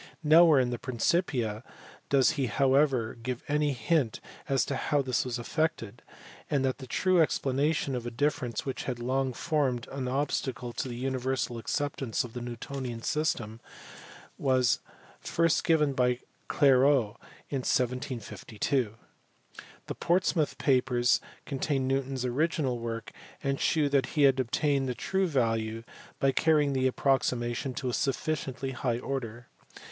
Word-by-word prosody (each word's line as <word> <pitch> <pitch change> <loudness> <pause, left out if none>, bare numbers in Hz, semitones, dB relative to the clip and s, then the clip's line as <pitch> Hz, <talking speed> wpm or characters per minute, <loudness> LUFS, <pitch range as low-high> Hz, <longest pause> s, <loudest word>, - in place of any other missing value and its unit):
Nowhere 160 -1 +7
in 125 -1 +1
the 120 - -3
Principia 120 - 0 0.5
does 135 -2 +4
he 135 -4 -1
however 130 0 +2
give 125 0 -4
any 150 0 +1
hint 130 0 0 0.3
as 135 -2 +2
to 140 - -2
how 145 +1 0
this 130 -2 0
was 125 -2 -3
effected, 145 -3 -2 0.5
and 135 -2 +1
the 130 0 -3
true 185 +6 +3
explanation 145 0 +1
of 120 -1 -4
a - - -1
difference 125 -2 -1
which 135 - -4
had 125 -2 -2
long 130 +2 0
formed 130 -4 -1
an 135 -2 -3
obstacle 130 -2 -2
to - - -3
the 120 - -5
universal 130 -1 -2
acceptance 135 -2 -2
of 120 -2 -9
the 125 - -5
Newtonian 120 0 -6
system 120 -8 -1 0.8
was 130 -3 +2 0.4
first 165 -1 +1
given 150 -4 +3
by 125 -2 +2 0.3
Clairaut 130 -5 +4 0.3
in 140 - 0
1752. 125 -2 -1 0.9
The - - -4
Portsmouth 175 -3 +1
papers 125 -2 +2 0.2
contain 135 -1 -1
Newton 135 0 0
s 130 -1 -3
original 135 -1 0
work, 115 -1 -5 0.3
and 135 -1 -1
shew 155 -3 +2
that 140 -2 +2
he 145 - +5
had 135 -1 +5
obtained 135 +2 +1
the 125 - -2
true 190 - 0
value 115 -5 0 0.4
by 135 - +3
carrying 150 0 +3
the 130 -1 +2
approximation 125 -1 0
to 130 - -3
a - - -3
sufficiently 135 -1 -2
high 125 -2 -1
order. 120 -2 -5
130 Hz, 140 wpm, -29 LUFS, 120-145 Hz, 0.9 s, Nowhere